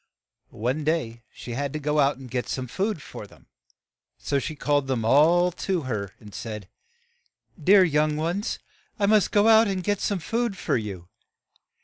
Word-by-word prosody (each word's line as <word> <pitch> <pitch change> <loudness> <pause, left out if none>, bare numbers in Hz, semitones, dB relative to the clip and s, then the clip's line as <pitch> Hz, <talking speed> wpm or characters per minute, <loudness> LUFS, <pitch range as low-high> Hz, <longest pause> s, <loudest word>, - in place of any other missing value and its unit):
One 125 +7 -2
day 145 -7 -1
she 120 - -9
had 140 +3 -3
to 155 - -3
go 150 +1 0
out 140 -2 +3
to 135 - -11
get 125 0 -4
some 130 - -3
food 190 - -2
for - - -9
them, - - -20 0.7
so 140 - -1
she 155 +3 -5
called 145 -2 0
them 125 -4 -1
all 170 +8 +5
to 185 0 -2
her, 105 -8 -4
and 105 -2 -13
said, 105 -4 -6 0.3
' 480 0 -41
' 160 - -21
Dear 195 +3 +7
young 150 -2 +1
ones, 170 +7 -2 0.4
I 200 - +1
must 210 0 +4
go 205 +1 +3
out 225 0 +6
and 190 -2 -2
get 205 +2 0
some 200 - 0
food 225 +3 -2
for - - -1
you. 100 -7 -4
150 Hz, 190 wpm, -25 LUFS, 125-195 Hz, 0.7 s, Dear